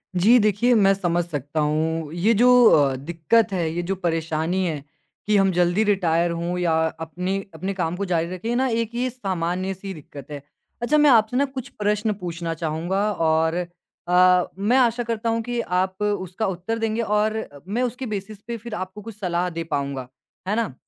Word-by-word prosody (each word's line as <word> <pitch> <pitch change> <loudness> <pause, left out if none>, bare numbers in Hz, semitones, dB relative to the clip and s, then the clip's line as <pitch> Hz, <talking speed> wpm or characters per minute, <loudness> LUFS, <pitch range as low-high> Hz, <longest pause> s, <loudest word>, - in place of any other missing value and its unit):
जी 220 +8 +6
देखिए, 215 +4 +3
मैं 195 -3 +5
समझ 175 -3 0
सकता 145 -2 -4
हूँ, 155 +1 -1
ये 195 +7 +2
जो 245 +4 +5 0.2
अ, 140 -3 +4
दिक्कत 170 - +1
है, 170 -3 0
ये 175 - -1
जो 195 +2 -2
परेशानी 165 +1 -1
है, 150 -5 -3 0.4
कि 210 - +3
हम 195 -1 +4
ज़ल्दी 175 +4 +2
रिटायर 175 -4 +2
हों 170 +1 -2
या 175 -2 +1 0.3
अपने 180 +4 -3 0.2
अपने 195 +1 -4
काम 175 -2 -2
को 200 +2 -3
जारी 170 -2 0
रखें 225 +7 -3
ना, 260 +1 +2
एक 230 0 -2
ये 250 +1 0
सामान्य-सी 190 -3 -3
दिक्क़त 145 -2 -12
है। 145 - -6 0.4
अच्छा 295 +6 +2
मैं 295 -1 +6
आपसे 230 0 +4
ना 280 - +3
कुछ 265 -2 -7
प्रश्न 210 +1 +1
पूछना 170 -1 -3
चाहूँगा 170 +6 -1
और 160 -2 +2
अ, 180 +1 +1
मैं 215 +7 +2
आशा 240 -1 +3
करता 230 0 -2
हूँ 230 0 0
कि 240 +1 -3
आप 185 +1 -1
उसका 205 0 -2
उत्तर 190 +5 -3
देंगे 225 +1 0
और 215 0 +1
अ, 145 -10 -7
मैं 235 +5 -1
उसके 250 +2 -3
बेसिस 205 -1 -6
पे 235 -1 -3
फिर 230 0 -7
आपको 190 +2 -6
कुछ 215 -1 -10
सलाह 180 -2 -1
दे 165 -1 -4
पाऊँगा, 140 -5 -3 0.4
है 210 - +1
ना? 225 - -1
185 Hz, 190 wpm, -23 LUFS, 170-220 Hz, 0.4 s, जी